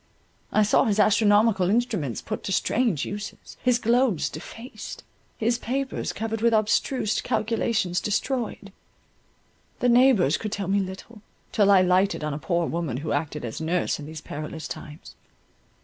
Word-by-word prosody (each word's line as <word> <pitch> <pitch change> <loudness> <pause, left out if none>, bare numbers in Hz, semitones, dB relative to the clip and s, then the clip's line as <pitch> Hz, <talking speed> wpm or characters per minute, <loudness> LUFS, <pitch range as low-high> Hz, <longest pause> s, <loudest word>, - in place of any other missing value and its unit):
I 215 - +4
saw 210 - +3
his 215 -1 +1
astronomical 210 -2 +4
instruments 210 - -1
put - - -5
to - - -3
strange 210 - +1
uses, 205 +1 -7
his 250 -1 +3
globes 230 - +1
defaced, 225 - -9 0.3
his 235 +2 0
papers 265 +3 -2
covered 225 0 -4
with 230 -1 +4
abstruse 215 +1 +1
calculations 215 -4 0
destroyed. 215 -1 -2 1.1
The 245 - +2
neighbours 240 - +5
could 215 - -5
tell 200 -3 -3
me 200 +1 +3
little, 195 +4 -7 0.3
till 205 -2 +3
I 190 -2 +6
lighted 185 -1 +2
on 150 -1 -2
a 145 - -4
poor 170 +1 0
woman 165 -7 -2
who - - -2
acted 145 -2 -2
as 115 +6 -6
nurse 170 +1 0
in 145 - -8
these 155 -1 -8
perilous 155 +1 -6
times. 150 +2 -9
205 Hz, 150 wpm, -25 LUFS, 170-230 Hz, 1.1 s, I